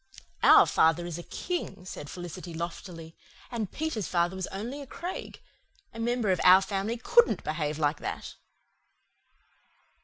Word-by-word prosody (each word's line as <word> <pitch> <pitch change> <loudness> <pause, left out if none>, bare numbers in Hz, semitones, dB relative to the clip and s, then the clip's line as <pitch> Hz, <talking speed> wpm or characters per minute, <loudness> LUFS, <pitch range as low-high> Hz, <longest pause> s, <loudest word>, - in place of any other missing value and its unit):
"Our - - +8
father 165 +2 +3
is 175 -1 -5
a 175 - -11
King," 355 - -4
said 145 -5 -7
Felicity 175 -1 -7
loftily, 165 -1 -7 0.4
"and 225 -5 -3
Peter's 305 - -3
father 175 +1 +1
was 190 -1 -3
only 235 +9 -5
a 280 - -9
Craig. 350 +7 -6 0.5
A 230 - -9
member 235 -3 +1
of 180 - +1
our 185 +1 +8
family 205 +4 -2
COULDN'T 475 - +3
behave 155 -1 -2
like 150 -1 0
that." - - -5
185 Hz, 145 wpm, -28 LUFS, 170-230 Hz, 0.5 s, Our